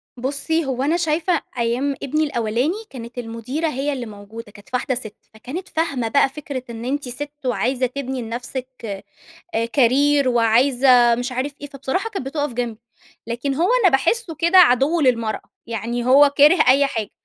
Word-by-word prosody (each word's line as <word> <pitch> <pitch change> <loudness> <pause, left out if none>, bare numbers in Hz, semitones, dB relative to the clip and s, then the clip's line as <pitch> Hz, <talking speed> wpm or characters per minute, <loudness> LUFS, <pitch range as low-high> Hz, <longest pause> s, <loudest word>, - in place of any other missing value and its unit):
بُصّي، 285 +5 -1
هو 260 0 -2
أنا 320 +4 +2
شايفة 330 +1 0 0.2
أيام 245 +4 0
ابني 305 +3 0
الأولاني، 245 - 0 0.2
كانت 235 -1 -10
المُديرة 245 +7 -3
هي 285 0 -2
اللي 250 -3 -5
موجودة 210 +1 -10
كانت 205 -1 -17
واحدة 250 +1 0
سِت. 215 -4 -6 0.2
فكانت 275 +12 -7
فاهمة 280 -8 -1
بقى 270 +3 +3
فكرة 275 -2 -6
إن 230 0 -7
أنتِ 275 -1 -2
سِت 285 +4 -6
وعايزة 250 +3 0
تبني 260 0 -4
لنفسِك 245 +3 -5 0.9
أ 230 +1 +1
career 280 +3 +3
وعايزة 240 +1 +4
مش 245 +2 -4
عارف 265 +3 -2
إيه. 290 - -6
فبصراحة 280 - -3
كانت 385 -11 -5
بتُقف 290 -1 -2
جنبي، 235 -2 -4 0.5
لكن 240 +4 -2
هو 340 +6 +1
أنا 375 - +7
باحسّه 335 - 0
كده 340 +4 +4
عَدِو 300 +1 +5
للمرأة. 230 -6 +1 0.2
يعني 235 +2 -3
هو 280 +3 +6
كاره 300 +5 +6
أي 275 +2 +5
حاجة. 220 -5 -4
260 Hz, 165 wpm, -21 LUFS, 235-290 Hz, 0.9 s, أنا